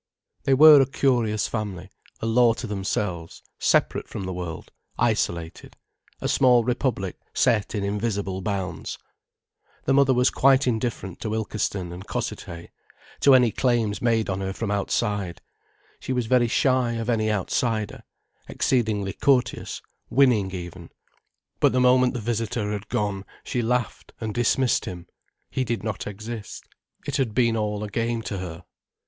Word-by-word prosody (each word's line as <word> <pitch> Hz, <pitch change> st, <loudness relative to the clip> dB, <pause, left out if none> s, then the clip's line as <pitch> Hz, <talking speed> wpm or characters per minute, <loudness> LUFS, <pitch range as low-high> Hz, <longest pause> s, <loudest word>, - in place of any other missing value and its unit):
They 135 Hz, -, +4 dB
were 150 Hz, 0 st, +9 dB
a 135 Hz, -, +2 dB
curious 120 Hz, -7 st, +1 dB
family, 100 Hz, -4 st, -5 dB, 0.3 s
a -, -, -2 dB
law 115 Hz, +1 st, +4 dB
to -, -, -6 dB
themselves, 95 Hz, -4 st, -3 dB, 0.2 s
separate -, -, +2 dB
from -, -, -6 dB
the 95 Hz, 0 st, -4 dB
world, 90 Hz, -2 st, -6 dB, 0.3 s
isolated, 85 Hz, -1 st, -1 dB, 0.4 s
a -, -, -2 dB
small 125 Hz, -3 st, +4 dB
republic 120 Hz, -6 st, -2 dB, 0.2 s
set 110 Hz, -4 st, +2 dB
in 100 Hz, -, -1 dB
invisible 100 Hz, -2 st, -2 dB
bounds. 95 Hz, -4 st, -4 dB, 0.9 s
The 135 Hz, -, +2 dB
mother 135 Hz, -1 st, +4 dB
was 125 Hz, +1 st, +3 dB
quite 135 Hz, 0 st, +4 dB
indifferent 115 Hz, -6 st, -2 dB
to 110 Hz, -1 st, -2 dB
Ilkeston 105 Hz, -4 st, -2 dB
and 90 Hz, +2 st, -9 dB
Cossethay, 85 Hz, 0 st, -5 dB, 0.5 s
to 140 Hz, -2 st, +6 dB
any 125 Hz, -3 st, +4 dB
claims 115 Hz, -5 st, 0 dB
made 115 Hz, -2 st, +2 dB
on 95 Hz, 0 st, -2 dB
her 95 Hz, 0 st, -3 dB
from 105 Hz, 0 st, -3 dB
outside, 100 Hz, -2 st, -1 dB, 0.6 s
she 130 Hz, -, -3 dB
was 125 Hz, -2 st, 0 dB
very 120 Hz, +1 st, +3 dB
shy 130 Hz, 0 st, +2 dB
of 115 Hz, -1 st, -3 dB
any 110 Hz, -2 st, +1 dB
outsider, 110 Hz, -, -1 dB, 0.5 s
exceedingly 110 Hz, -6 st, 0 dB
courteous, 130 Hz, -3 st, 0 dB, 0.3 s
winning 120 Hz, -7 st, +3 dB
even. 90 Hz, -2 st, -8 dB, 0.7 s
But -, -, +4 dB
the 130 Hz, -, +2 dB
moment 125 Hz, 0 st, +4 dB
the 120 Hz, -, -3 dB
visitor 115 Hz, -1 st, -2 dB
had 105 Hz, 0 st, -5 dB
gone, 100 Hz, -2 st, -1 dB, 0.2 s
she 125 Hz, -, -2 dB
laughed 120 Hz, 0 st, -2 dB
and 110 Hz, -2 st, -4 dB
dismissed 120 Hz, +2 st, +2 dB
him, 90 Hz, -1 st, -7 dB, 0.5 s
he 130 Hz, -, 0 dB
did 115 Hz, -3 st, -3 dB
not 110 Hz, -3 st, -4 dB
exist. 110 Hz, +2 st, -7 dB, 0.4 s
It -, -, -2 dB
had 115 Hz, -6 st, -1 dB
been 115 Hz, -2 st, +3 dB
all 105 Hz, -1 st, -2 dB
a -, -, -3 dB
game 115 Hz, +2 st, -2 dB
to 100 Hz, -4 st, -4 dB
her. 90 Hz, -1 st, -7 dB
110 Hz, 150 wpm, -24 LUFS, 100-125 Hz, 0.9 s, were